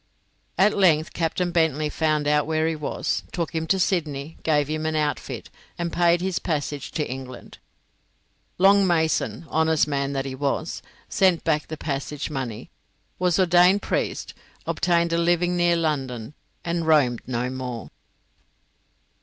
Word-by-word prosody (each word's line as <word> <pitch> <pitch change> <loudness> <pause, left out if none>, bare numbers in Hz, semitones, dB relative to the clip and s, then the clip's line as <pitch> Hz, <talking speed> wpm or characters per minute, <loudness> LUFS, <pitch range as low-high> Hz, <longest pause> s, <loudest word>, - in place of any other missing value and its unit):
At 205 +2 +4
length 165 -5 +3
Captain 175 +2 -1
Bentley 160 -3 +1
found 155 -1 0
out 150 0 +2
where 160 0 +1
he 165 - -1
was, 150 -1 -2
took 170 -1 -3
him 160 0 -2
to 195 - +3
Sydney, 160 -5 -1
gave 150 -3 +2
him 155 +1 -2
an 160 - -1
outfit, 150 -1 -2 0.3
and 170 -1 -3
paid 175 0 +3
his 185 -1 -1
passage 145 -3 -3
to 150 - -1
England. 130 -1 -8 1.0
Long 195 +1 +5
Mason, 165 0 0
honest 160 -1 +2
man 140 -1 -1
that 135 0 -2
he 135 - -4
was, 140 +4 -2 0.3
sent 185 -4 +2
back 155 -2 0
the 155 - -6
passage 145 +1 -4
money, 130 -6 -5 0.5
was 180 -2 +2
ordained 180 +2 +5
priest, - - -2 0.3
obtained 170 -1 +1
a 170 - +2
living 175 +1 +2
near 175 -1 +3
London, 135 -7 -2 0.3
and 170 -1 -1
roamed 135 -7 +3
no 125 0 -2
more. 125 -3 -6
160 Hz, 145 wpm, -24 LUFS, 145-170 Hz, 1.0 s, Long